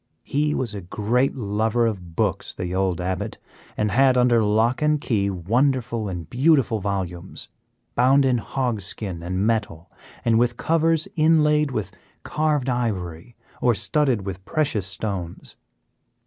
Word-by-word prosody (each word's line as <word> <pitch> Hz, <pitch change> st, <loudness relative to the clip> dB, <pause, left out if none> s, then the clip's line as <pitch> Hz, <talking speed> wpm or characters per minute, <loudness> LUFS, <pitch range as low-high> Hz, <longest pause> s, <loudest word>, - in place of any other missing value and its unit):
He 150 Hz, +1 st, 0 dB
was 120 Hz, -5 st, -2 dB
a 100 Hz, -, -5 dB
great 110 Hz, +8 st, 0 dB
lover 110 Hz, 0 st, 0 dB
of 90 Hz, -7 st, -4 dB
books, -, -, -1 dB
the 90 Hz, 0 st, -4 dB
old 95 Hz, -2 st, 0 dB
Abbot, 90 Hz, 0 st, -3 dB, 0.4 s
and 105 Hz, -1 st, 0 dB
had 130 Hz, +3 st, +4 dB
under 120 Hz, -2 st, +4 dB
lock 110 Hz, +5 st, +2 dB
and 150 Hz, 0 st, +2 dB
key 105 Hz, -8 st, 0 dB
wonderful 115 Hz, -, 0 dB
and 85 Hz, -4 st, -6 dB
beautiful 130 Hz, -, +2 dB
volumes, 95 Hz, -3 st, -4 dB, 0.4 s
bound 135 Hz, +3 st, +4 dB
in 125 Hz, -2 st, +2 dB
hog 120 Hz, -3 st, -2 dB
skin 95 Hz, -2 st, -5 dB
and 90 Hz, +3 st, -1 dB
metal, 105 Hz, -8 st, -2 dB, 0.3 s
and 115 Hz, -1 st, +4 dB
with 120 Hz, 0 st, +1 dB
covers 165 Hz, 0 st, +1 dB
inlaid 150 Hz, -2 st, +3 dB
with 110 Hz, -7 st, -3 dB, 0.3 s
carved 150 Hz, -4 st, 0 dB
ivory, 110 Hz, -4 st, -3 dB, 0.3 s
or 120 Hz, -2 st, +3 dB
studded 120 Hz, -1 st, +1 dB
with 95 Hz, -1 st, -6 dB
precious 135 Hz, -, -1 dB
stones. 95 Hz, -3 st, -5 dB
115 Hz, 140 wpm, -23 LUFS, 95-135 Hz, 0.4 s, had